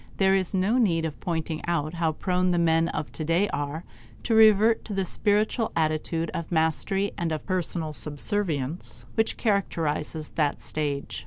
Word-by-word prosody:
There 190 -1 +4
is 190 0 +1
no 200 +7 +2
need 170 -8 +2
of 155 - -5
pointing 160 -2 -3
out 160 -2 0
how 165 -2 0
prone 180 +2 0
the 175 - +2
men 165 -1 +3
of 155 - -4
today 165 +5 +1
are 145 +3 -3 0.4
to 230 - 0
revert 220 0 +6
to 205 - -5
the 195 -1 0
spiritual 215 +4 +1
attitude 160 +1 0
of 170 0 -5
mastery 175 +5 +1
and 170 -1 -1
of 155 - -3
personal 170 -4 -2
subservience 150 - -3
which 220 0 0
characterizes 160 -7 -1
that 150 -3 0
stage. 145 -2 -3
170 Hz, 160 wpm, -26 LUFS, 155-195 Hz, 0.4 s, revert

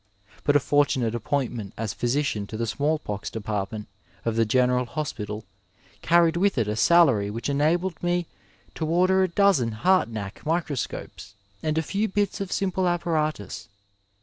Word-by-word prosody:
but 145 - +2
a - - +7
fortunate 135 -4 +1
appointment 120 -3 -2
as 110 -2 -3
physician 120 -5 -1
to 110 - -6
the 115 - -1
smallpox 140 -5 -2
department 105 -1 -4 0.4
of 115 -1 0
the 115 0 +3
General 125 +1 +2
Hospital 110 -7 -4 0.6
carried 170 0 +4
with 195 -1 +2
it 115 -3 +1
a 105 - -1
salary 130 -6 +4
which 115 +5 -4
enabled 165 +6 +1
me 175 0 0 0.5
to 160 - -3
order 185 +3 +3
a 190 - +3
dozen 170 - +3
Hartnack 110 - 0
microscopes 130 - -3 0.3
and 155 0 -1
a 160 - +2
few 205 +7 -1
bits 205 0 -1
of 195 - -4
simple 190 -2 0
apparatus. 155 - -1
145 Hz, 150 wpm, -25 LUFS, 110-175 Hz, 0.6 s, a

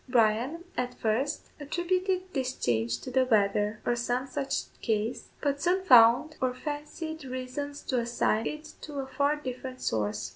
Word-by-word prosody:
Bryan, 245 +7 +2
at 250 0 -2
first, 245 +7 -1
attributed 365 +4 -1
this 260 -1 -1
change 115 0 0
to 255 - -6
the 260 +1 +4
weather, 210 -2 +2
or 240 - +2
some 245 +2 -1
such 275 +1 -2 0.2
cause, 220 +1 -1
but 285 -1 0
soon 370 +2 +2
found 245 +3 +7
or 255 -1 +1
fancied 300 +3 -5
reasons 260 +3 -5
to 255 - 0
assign 230 -2 +1
it 305 +1 -6
to 300 - -8
a 270 - -2
far 285 +2 +1
different 255 -2 -6
source. 105 -1 -1
255 Hz, 155 wpm, -29 LUFS, 230-295 Hz, 0.2 s, found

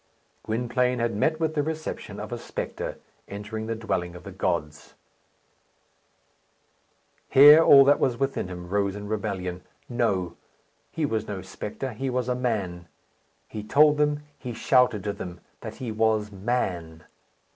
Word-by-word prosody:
Gwynplaine 125 +2 0
had 115 -2 -1
met 155 +9 +1
with 160 -1 0
the 150 - +1
reception 155 +1 -5
of - - -7
a - - -4
spectre - - -5 0.3
entering 110 +2 -6
the 115 - -2
dwelling 90 -6 -3
of 90 - -11
the - - -8
gods. 75 -1 -3 2.3
Here 145 +4 +9
all 140 -3 +8
that 145 +1 +5
was 125 -3 +1
within 135 -7 -1
him 90 -1 -8
rose 100 +1 0
in 105 0 -7
rebellion. 100 -4 -3 0.3
No, 95 -8 -1 0.5
he 160 -2 -2
was 110 -5 -2
no 100 -3 -5
spectre; 105 +6 -6
he 130 +5 -3
was 125 -1 -1
a 125 - +1
man. 100 -9 -2 0.6
He 110 - -6
told 150 +7 +5
them, 150 0 +1 0.2
he 125 -3 -6
shouted 125 -3 +3
to 105 -1 -2
them, 90 -3 -8 0.2
that - - -8
he 125 -3 -5
was 110 -1 +1
Man. 95 -6 -2
110 Hz, 150 wpm, -26 LUFS, 95-130 Hz, 2.3 s, Here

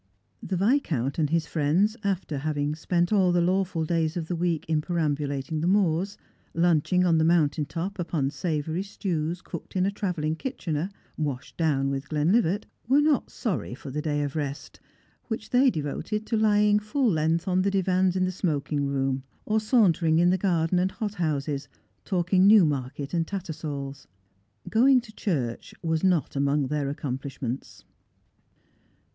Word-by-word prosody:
The 185 - -2
Viscount 175 - +1
and 150 -2 +2
his 165 0 +1
friends, 165 +8 +1
after 185 -7 -1
having 145 0 -1
spent 175 +4 0
all 190 -3 +4
the 175 - +3
law 185 +3 +2
ful 170 -3 -3
days 165 0 0
of 160 -2 -4
the 175 - -1
week 170 -2 -1
in 155 -1 +1
perambulating 150 -2 -1
the 170 - 0
moors, 190 0 +1 0.4
lunching 175 +2 +3
on 165 -2 +3
the - - +3
mountain 155 -3 +2
top 180 +5 -4
upon 155 -5 -1
savoury 160 +2 -2
stews 175 -3 -3
cooked 170 - -8
in 185 0 +2
a 200 - +1
travelling 175 -6 -2
kitchener, 175 - -3 0.3
washed 135 -4 -3
down 140 -4 +1
with 140 0 -4
Glenlivat, 175 +6 +2 0.2
were 270 +4 +5
not 295 -1 +2
sorry 145 - -3
for 135 +1 -9
the 150 +3 -2
day 145 -1 -1
of 145 0 -4
rest, 145 -1 -5 0.5
which 225 -2 -5
they 260 +2 +5
devoted 195 - -3
to 230 - -1
lying 210 -1 +4
full 240 +6 0
length 160 +1 +1
on 185 0 +2
the 200 - +2
divans 185 -1 +2
in 185 -1 +2
the 185 - -1
smoking 150 -5 -1
room, 135 -1 -1 0.2
or 220 +1 +2
sauntering 185 - +3
in 175 +1 +4
the - - +3
garden 180 -2 +1
and 185 +1 0
hot 215 -3 -3
houses, 145 -5 -2 0.4
talking 185 0 +3
Newmarket 145 - +3
and 165 -2 0
Tattersall's. 150 -7 -5 0.6
Going 255 +4 +5
to 230 -3 -12
church 135 - -3
was 160 0 0
not 180 -7 +2
among 140 0 +1
their 145 -2 -1
accomplishments. 135 -2 -5
165 Hz, 165 wpm, -26 LUFS, 145-190 Hz, 0.6 s, were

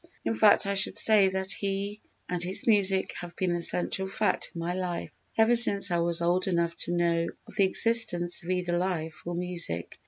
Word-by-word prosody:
_In 225 - -4
fact 215 -2 +1
I 200 - -4
should 195 - +1
say 210 -3 +6
that 190 0 -6
he 200 +1 -5 0.3
and 180 -1 -6
his 180 +2 0
music 195 -4 0
have 175 0 -12
been 185 -2 -4
the 175 - -5
central 185 +3 -1
fact 210 +2 -4
in - - -15
my 170 +1 -6
life 180 -2 -7 0.3
ever 225 +2 +1
since 200 -5 +8
I 170 - -2
was 170 0 -3
old 180 +2 -2
enough 170 -2 -4
to - - -6
know 170 -1 -3 0.2
of - - -15
the 200 - +1
existence 190 -4 +3
of 170 - -14
either 180 -1 -4
life 165 -4 -7
or 175 - -7
music_. 170 - -4
180 Hz, 205 wpm, -24 LUFS, 175-200 Hz, 0.3 s, since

